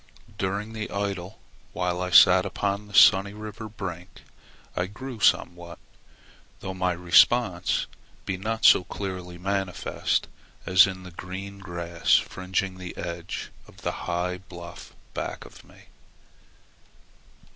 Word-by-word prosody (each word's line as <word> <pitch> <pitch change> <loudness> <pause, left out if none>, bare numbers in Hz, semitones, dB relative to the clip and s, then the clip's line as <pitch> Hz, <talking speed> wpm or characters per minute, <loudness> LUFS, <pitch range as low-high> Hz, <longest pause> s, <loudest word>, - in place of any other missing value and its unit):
During 100 +3 -2
the 110 -1 -5
idle 100 0 -4 0.4
while 90 0 -1
I 90 - -2
sat 90 0 +8
upon 100 +1 -2
the 100 - -15
sunny 95 +2 +7
river 110 +1 -8
brink, 90 -4 -8 0.5
I 90 - -1
grew 120 +4 -8
somewhat, 85 -3 +1 0.8
though 95 - -5
my 90 0 0
response 90 +2 +3 0.4
be 95 - -2
not 110 +4 -2
so - - +8
clearly 90 -2 -6
manifest 95 0 -1 0.4
as 90 +1 +7
in 95 -1 -6
the 90 - -10
green 95 +3 -7
grass 85 -3 0
fringing 95 0 -1
the 90 -1 -8
edge 85 0 -5 0.2
of - - -17
the - - 0 0.2
high 90 +1 -1
bluff 85 -2 -11 0.2
back - - -5
of - - -14
me. - - -19
95 Hz, 125 wpm, -26 LUFS, 90-100 Hz, 0.8 s, sat